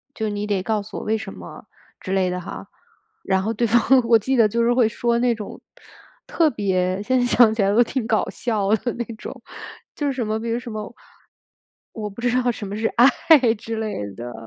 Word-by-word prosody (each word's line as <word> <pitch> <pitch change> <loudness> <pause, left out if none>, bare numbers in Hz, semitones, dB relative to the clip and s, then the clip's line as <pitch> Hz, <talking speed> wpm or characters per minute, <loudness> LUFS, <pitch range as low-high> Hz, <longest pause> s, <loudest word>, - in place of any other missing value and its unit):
就 220 - -3
是 210 - -2
你 205 0 -3
得 200 -3 -1
告 215 0 -1
诉 200 - -9
我 - - -5
为 220 +1 0
什 220 - -7
么 - - -11 0.3
之 190 - -7
类 190 -1 +2
的 180 0 -3
哈。 180 - -8 0.6
然 190 0 +1
后 225 +2 -1
对 235 +2 0
方 235 +2 +4 0.3
我 230 -1 +6
记 260 +5 -1
得 230 -3 +5
就 235 +3 0
是 240 +1 +3
会 240 -3 +3
说 235 +1 0
那 245 0 +2
种， 215 -2 -8 0.7
特 325 -2 +2
别 190 -4 -1
现 255 +3 +1
在 245 - +2
想 240 -2 +5
起 220 - -1
来 195 - +2
都 235 +3 +5
挺 245 -1 -3
搞 220 -2 +1
笑 215 -5 -2
的 240 +3 -3
那 240 -1 -4
种， - - -10 0.5
就 290 - -2
是 275 - 0
什 250 -3 -3
么， 215 +1 -2
比 230 +1 -4
如 230 - 0
什 240 -2 -8
么 215 0 -6 1.0
我 215 -2 -4
不 200 +3 -11
知 245 0 +1
道 245 - +1
什 220 -3 -5
么 200 +1 -5
是 225 +1 -1
爱 245 +3 +7 0.4
之 225 +1 -6
类 215 - -3
的， 120 +2 -7
220 Hz, 250 characters per minute, -22 LUFS, 205-240 Hz, 1.0 s, 爱